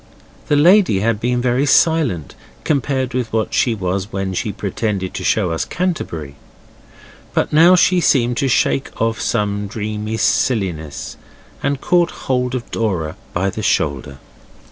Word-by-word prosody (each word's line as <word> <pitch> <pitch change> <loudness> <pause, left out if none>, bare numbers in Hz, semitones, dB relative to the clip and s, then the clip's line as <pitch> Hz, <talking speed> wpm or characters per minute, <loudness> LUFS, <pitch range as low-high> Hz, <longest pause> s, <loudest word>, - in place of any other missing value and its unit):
The 145 - +2
lady 170 - +5
had 110 -1 0
been 120 +1 0
very 130 +3 +1
silent 145 - +2 0.3
compared 135 -3 -1
with 125 -3 -2
what 110 -1 -1
she 120 -3 +2
was 95 0 -3
when 95 -1 -3
she 105 +3 -2
pretended 100 -1 -3
to - - -5
show 95 -6 +1
us 80 - -1
Canterbury. 85 - -4 1.0
But - - 0
now 170 +4 +7
she 180 0 +3
seemed 120 -6 +2
to 140 - +1
shake 135 +1 +1
off 115 -3 0
some 105 -2 -1
dreamy 105 +1 -4
silliness, 90 - -1 0.4
and 140 -1 -1
caught 175 -1 +2 0.2
hold 125 -1 0
of 120 - -6
Dora 90 -9 -2 0.2
by 95 +2 -1
the 110 - -5
shoulder. 70 - -1
110 Hz, 145 wpm, -18 LUFS, 95-135 Hz, 1.0 s, now